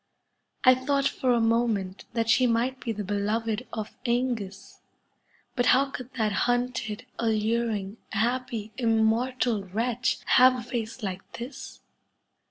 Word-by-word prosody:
I 255 - +8
thought 275 +2 +1
for 255 - 0
a 240 - +3
moment 225 -4 0
that 230 -1 0
she 250 +2 +4
might 245 +3 0
be 235 - -3
the 210 -1 -4
beloved 215 +4 -1
of 215 -2 -5
^ngus, 235 -6 -2 0.8
but 245 - +1
how 270 +2 +4
could 255 0 -7
that 220 -4 +1
hunted, 245 0 -1
alluring, 220 -2 0
happy, 230 -1 -1
immortal 230 0 +1
wretch 235 +6 0
have 255 0 +6
a 245 - -5
face 230 -1 -4
like 185 -2 -5
this 250 +4 -8
230 Hz, 130 wpm, -27 LUFS, 215-250 Hz, 0.8 s, I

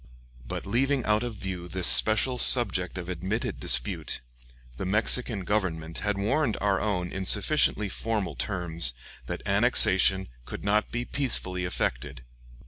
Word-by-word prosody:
] - - -22
But - - -6
leaving 130 +6 -1
out 105 0 +1
of 120 -2 -5
view 95 -3 -7
this 90 0 -2
special 120 +4 +3
subject 95 -10 +5
of 90 -1 -7
admitted 95 +5 -4
dispute, 65 -1 -3 0.6
the - - -5
Mexican 105 +2 +3
Government 85 -5 -3
had 105 -2 -2
warned 115 +4 -1
our 100 -1 0
own 90 -5 -3
in 95 - -5
sufficiently 105 +1 +2
formal 110 0 -4
terms 85 - +1 0.3
that - - -6
annexation 95 +1 +3 0.2
could - - -9
not 105 +1 0
be 120 +1 -4
peacefully 90 -11 -1
effected. 65 -5 -4
95 Hz, 140 wpm, -26 LUFS, 90-110 Hz, 0.6 s, subject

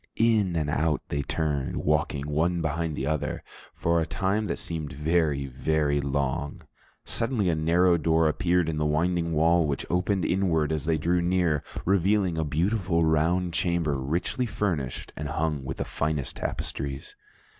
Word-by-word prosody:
In 110 -6 +2
and 80 -3 0
out 80 -1 0
they 70 - -1
turned, 70 -2 -2
walking 75 -1 0
one 80 +4 +1
behind 80 -1 -1
the 65 - -3
other, 75 +1 -2 0.3
for 85 0 +1
a - - 0
time 100 +6 0
that 85 - -2
seemed 80 -3 -4
very, 75 -1 +1
very 70 +2 0
long. 70 0 -2 0.4
Suddenly 115 -5 0
a 80 - +2
narrow 85 +3 +3
door 80 0 +2
appeared 85 +2 +1
in 80 -1 -2
the 75 - 0
winding 85 +2 +1
wall, 80 +1 +3
which 70 -2 -2
opened 90 +2 +1
inward 80 -5 +1
as 75 -1 -2
they 80 0 +2
drew 85 +3 +1
near, 85 -4 +1 0.2
revealing 95 -2 +2
a - - +1
beautiful 85 +3 0
round 85 +3 +2
chamber 85 -3 +1
richly 80 - -1
furnished 85 - -3
and 75 - -4
hung 75 -2 -1
with 65 0 -5
the - - -2
finest 75 -2 -2
tapestries. 70 0 -4
80 Hz, 160 wpm, -27 LUFS, 75-90 Hz, 0.4 s, narrow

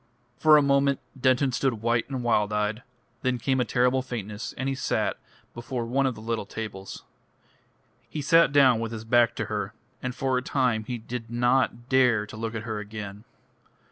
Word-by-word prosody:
For 155 +4 +6
a 145 - +4
moment 140 0 +3 0.2
Denton 130 +1 +2
stood 130 0 0
white 115 +1 +1
and 130 -3 -3
wild 105 -3 +2
eyed; 105 +2 -1 0.4
then 130 -1 0
came 130 +2 0
a - - +3
terrible 125 +2 +2
faintness, 110 -4 -5
and 130 - -2
he 135 - 0
sat 130 - -1 0.3
before 120 0 -4
one 135 +3 +1
of 130 - -2
the 110 - -10
little 115 -2 -3
tables. 100 -3 -7 1.1
He 150 - -4
sat 165 +1 +5
down 135 -5 +5
with 115 0 -3
his 110 -1 -6
back 120 0 +3
to 110 - -2
her, 105 0 -4 0.3
and 130 -1 -4
for 130 -1 0
a - - -6
time 125 -5 0
he 125 +1 -3
did 115 0 -7
not 120 0 +1
dare 125 -5 +3
to 105 - -11
look 115 +1 -4
at 110 - -4
her 110 -2 -4
again. 105 0 -8
120 Hz, 190 wpm, -26 LUFS, 110-130 Hz, 1.1 s, For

